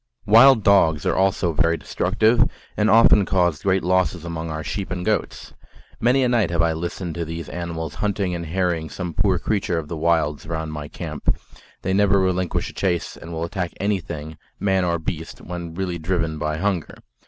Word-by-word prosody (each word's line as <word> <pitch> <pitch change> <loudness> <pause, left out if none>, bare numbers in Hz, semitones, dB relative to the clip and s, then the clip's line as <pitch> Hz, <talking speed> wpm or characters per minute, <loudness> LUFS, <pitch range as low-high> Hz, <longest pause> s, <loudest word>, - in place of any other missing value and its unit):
Wild 115 +2 +7
dogs 80 -7 +4
are - - +1
also 95 -3 +1
very 85 +2 +2
destructive, 110 +9 +2 0.3
and 105 +1 +2
often 115 -2 +6
caused 90 -5 +1
great 95 -1 +1
losses 90 -1 +1
among 85 -1 -4
our 80 0 -4
sheep 100 -2 -4
and 90 -1 -4
goats. 110 -1 -2 0.5
Many 125 +3 +3
a - - +3
night 115 -6 +2
have 85 -1 +1
I 80 -1 +2
listened 85 +1 -4
to 85 - -3
these 80 0 -6
animals 80 -2 -5
hunting 100 -3 0
and 85 -1 -4
harrying 85 -2 -1
some 90 -3 -5
poor 95 0 +2
creature 95 0 -1
of 75 -2 -4
the 85 - -3
wilds 80 -3 0
round 80 -2 -4
my 75 -1 -5
camp; - - -3 0.5
they 95 - 0
never 100 0 +4
relinquish 95 -1 0
a - - -23
chase, 90 -4 -1
and 80 - -10
will 80 0 -3
attack 85 +1 -3
anything, 85 -6 -3 0.2
man 95 -2 +1
or 85 -1 +1
beast, 80 0 -5
when 85 -1 -7
really 90 -2 -3
driven 80 -2 -1
by 75 0 -2
hunger. 95 -3 -1
85 Hz, 190 wpm, -22 LUFS, 80-95 Hz, 0.5 s, Wild